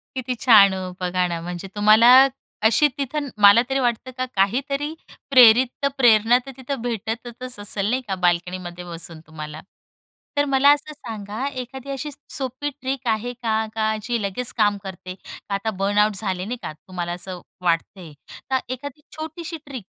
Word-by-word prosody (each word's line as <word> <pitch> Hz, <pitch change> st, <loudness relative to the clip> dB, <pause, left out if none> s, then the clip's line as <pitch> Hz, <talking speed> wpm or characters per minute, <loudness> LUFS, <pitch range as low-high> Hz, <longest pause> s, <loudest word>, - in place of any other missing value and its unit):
किती 255 Hz, -1 st, -3 dB
छान 215 Hz, -5 st, +6 dB
हो 185 Hz, -1 st, -4 dB
बघा 180 Hz, 0 st, 0 dB
ना, 170 Hz, -1 st, -4 dB
म्हणजे 175 Hz, +2 st, -6 dB
तुम्हाला 215 Hz, +3 st, +6 dB, 0.6 s
अशी 230 Hz, +7 st, +5 dB
तिथं 285 Hz, +1 st, -3 dB
मला 205 Hz, +3 st, +8 dB
तरी 270 Hz, 0 st, +1 dB
वाटतं 245 Hz, 0 st, -1 dB
का 255 Hz, -, -1 dB
काहीतरी 275 Hz, +9 st, 0 dB, 0.4 s
प्रेरित्त 250 Hz, +2 st, +6 dB
प्रेरणा 235 Hz, -2 st, +5 dB
तर 270 Hz, -, -8 dB
तिथं 265 Hz, -1 st, -5 dB
भेटतचच 240 Hz, +1 st, -5 dB
असेल, 205 Hz, 0 st, -2 dB
नाही 255 Hz, +3 st, 0 dB
का, 195 Hz, -, -1 dB
बाल्कनीमध्ये 180 Hz, 0 st, -1 dB
बसून 165 Hz, -1 st, -8 dB
तुम्हाला. 155 Hz, 0 st, -8 dB, 0.8 s
तर 290 Hz, -, +3 dB
मला 275 Hz, 0 st, +4 dB
असं 290 Hz, +1 st, -4 dB
सांगा 220 Hz, -2 st, -6 dB
एखादी 265 Hz, 0 st, -7 dB
अशी 275 Hz, +2 st, -4 dB, 0.3 s
सोपी 265 Hz, +2 st, -3 dB
ट्रिक 265 Hz, -1 st, -3 dB
आहे 225 Hz, +2 st, -1 dB
का 220 Hz, -2 st, -1 dB
का 220 Hz, 0 st, +1 dB
जी 235 Hz, 0 st, -1 dB
लगेच 205 Hz, +5 st, -2 dB
काम 205 Hz, -2 st, +3 dB
करते? 185 Hz, -1 st, -8 dB
का 200 Hz, -, -9 dB
आता 220 Hz, +3 st, -2 dB
बर्नआउट 205 Hz, +1 st, +2 dB
झाले, 190 Hz, -2 st, -2 dB
नाही 245 Hz, +4 st, -4 dB
का, -, -, -5 dB
तुम्हाला 175 Hz, +2 st, -6 dB
असं 180 Hz, 0 st, -7 dB, 0.2 s
वाटतेय. 170 Hz, -1 st, -1 dB, 0.4 s
तर 265 Hz, -, +4 dB, 0.2 s
एखादी 285 Hz, +3 st, -8 dB, 0.2 s
छोटीशी 320 Hz, +2 st, -6 dB
ट्रिक 260 Hz, -8 st, -8 dB
220 Hz, 160 wpm, -22 LUFS, 190-260 Hz, 0.8 s, मला